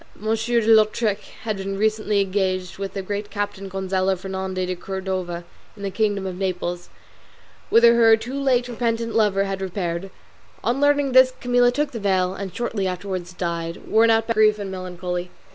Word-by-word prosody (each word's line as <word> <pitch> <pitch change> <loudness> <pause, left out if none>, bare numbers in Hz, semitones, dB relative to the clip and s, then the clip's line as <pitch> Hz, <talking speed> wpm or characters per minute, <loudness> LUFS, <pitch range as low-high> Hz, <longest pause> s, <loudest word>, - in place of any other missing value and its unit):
de 215 - -11 0.4
Lautrec 215 -1 +3 0.2
had 215 -2 -2
been 195 0 -4
recently 215 -1 +1
engaged 185 -2 -1
with 195 0 -5
the 195 - -3
Great 205 +2 -4
Captain 200 -1 -4
Gonzalo 190 0 0
Fernandez 190 0 -3
de 185 0 -3
Cordova 185 -2 -4 0.3
in 200 - -9
the 195 - -2
kingdom 205 -1 0
of 185 -1 -5
Naples, 180 -2 -3 0.8
whither 235 +1 +7
her 225 -1 +6
too 230 +4 -7
late 265 -3 +1
repentant 230 -1 -2
lover 205 -3 +3
had 195 -1 -3
repaired. 185 -1 -3 0.5
On 245 +6 0
learning 285 -1 +3
this 260 0 +6
Camilla 245 0 +3
took 295 +4 -1
the 230 - -5
veil, 190 -2 +1
and 195 -1 -6
shortly 220 -4 -2
afterwards 185 -1 -4
died, 170 -2 -4
worn 225 +1 +4
out 225 0 +3
by 230 - 0
grief 215 -1 +4
and 200 -2 -5
melancholy. 180 -1 -4
195 Hz, 170 wpm, -23 LUFS, 185-225 Hz, 0.8 s, whither